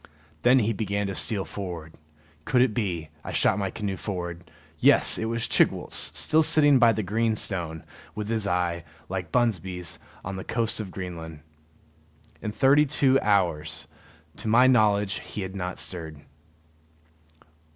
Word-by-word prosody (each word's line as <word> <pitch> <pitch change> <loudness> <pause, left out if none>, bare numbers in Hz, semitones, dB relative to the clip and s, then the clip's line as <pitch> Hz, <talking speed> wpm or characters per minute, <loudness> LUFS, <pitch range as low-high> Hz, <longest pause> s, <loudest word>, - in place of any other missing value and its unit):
Then 125 +7 +5
he 115 -2 +1
began 100 0 -2
to 100 - -3
steal 100 +1 +2
forward. 85 -5 -7 0.5
Could 125 +8 +3
it 125 -4 0
be 90 -8 -3
I - - -6
shot - - +2
my 100 -1 -1
canoe 100 -1 -4
forward 85 -3 -6 0.3
yes, - - +5
it 110 - -2
was 115 +1 -2
Chigwooltz, 75 - +1
still 155 - +3
sitting 150 -3 +5
by 120 -2 +6
the 110 -1 -2
green 110 +3 0
stone, 85 -6 -3 0.3
with 105 -1 -4
his 110 -2 -1
eye, 90 -2 -1 0.3
like 95 -4 -4
Bunsby's, 95 -8 -1 0.3
on 95 +1 -5
the 95 - -6
coast 115 -1 -1
of 105 -3 -5
Greenland. 85 -5 -8 1.0
In 105 - -4
thirty 140 +6 +4
two 135 -1 +3
hours, 85 -7 0 0.5
to - - -7
my 120 +4 +5
knowledge, 105 -5 +3
he 105 - -7
had 95 0 -6
not 90 -1 -4
stirred. 80 -5 -5
100 Hz, 150 wpm, -25 LUFS, 90-115 Hz, 1.0 s, by